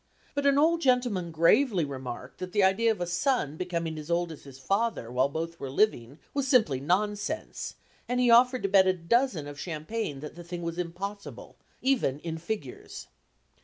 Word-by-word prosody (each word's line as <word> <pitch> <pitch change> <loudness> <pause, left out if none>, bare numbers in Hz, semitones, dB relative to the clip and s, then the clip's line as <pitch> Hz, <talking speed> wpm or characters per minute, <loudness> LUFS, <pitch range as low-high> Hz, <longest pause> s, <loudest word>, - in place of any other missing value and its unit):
But 285 0 +1
an 280 0 +4
old 330 +3 +3
gentleman 245 - +1
gravely 170 - +3
remarked 130 -3 -7
that 185 0 -6
the 205 - +3
idea 195 +5 +3
of 220 - -3
a - - +1
son 175 - 0
becoming 170 -2 -3
as 150 +1 -9
old 170 0 0
as 155 - -11
his 135 -2 -11
father 195 - -1
while 130 +2 +2
both 165 +3 -4
were 135 - -5
living 135 - +1 0.2
was 280 -1 -1
simply 220 - +3
nonsense, 205 - -2 0.3
and 250 0 0
he 245 -1 +4
offered 250 +2 +5
to - - +2
bet 190 -1 +5
a 185 - +4
dozen 185 - +1
of 145 -1 -9
champagne 155 0 -4
that 150 - -7
the 175 - -10
thing 175 0 -6
was 170 +1 -4
impossible, 195 +4 -6 0.3
even 255 - +2
"in 165 -1 -4
figures." 220 - -6
180 Hz, 185 wpm, -28 LUFS, 160-230 Hz, 0.3 s, offered